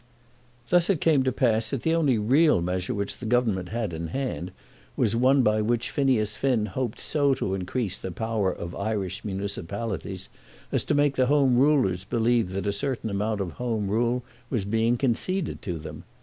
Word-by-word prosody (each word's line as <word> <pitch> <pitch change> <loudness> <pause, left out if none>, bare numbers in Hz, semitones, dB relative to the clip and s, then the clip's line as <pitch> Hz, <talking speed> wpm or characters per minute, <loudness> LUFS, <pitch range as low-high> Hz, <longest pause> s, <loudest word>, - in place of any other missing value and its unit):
Thus 175 0 +3
it 190 -6 +2
came 155 -4 +3
to 130 0 +1
pass 115 -3 +1
that 130 -1 -3
the 160 - +2
only 150 -7 +3
real 135 - +4
measure 90 +2 -2
which 100 0 -3
the 120 - -5
Government 110 -7 +1
had 110 -5 -3
in 80 +1 -4
hand 95 -4 -3 0.5
was 110 - +2
one 130 +3 +4
by 110 -1 +3
which 120 +2 0
Phineas 125 -7 +1
Finn 125 -6 +1
hoped 110 +3 -3
so 140 -3 +2
to 95 - -2
increase 95 +2 -2
the - - -5
power 110 -1 -1
of 85 0 -6
Irish 100 -2 -3
municipalities 100 0 -4 0.4
as - - +1
to - - +1
make 145 -1 +2
the 130 -1 +3
Home 140 -3 +4
Rulers 125 -10 +3
believe 115 0 +1
that 95 +1 -3
a 100 - 0
certain 125 -1 -2
amount 105 +1 -1
of 90 -3 -3
Home 115 -5 -1
Rule 120 +3 +1 0.3
was 115 -7 -1
being 115 +3 +1
conceded 150 +9 -1
to 90 -3 -4
them. 75 -1 -8
115 Hz, 185 wpm, -26 LUFS, 100-130 Hz, 0.5 s, real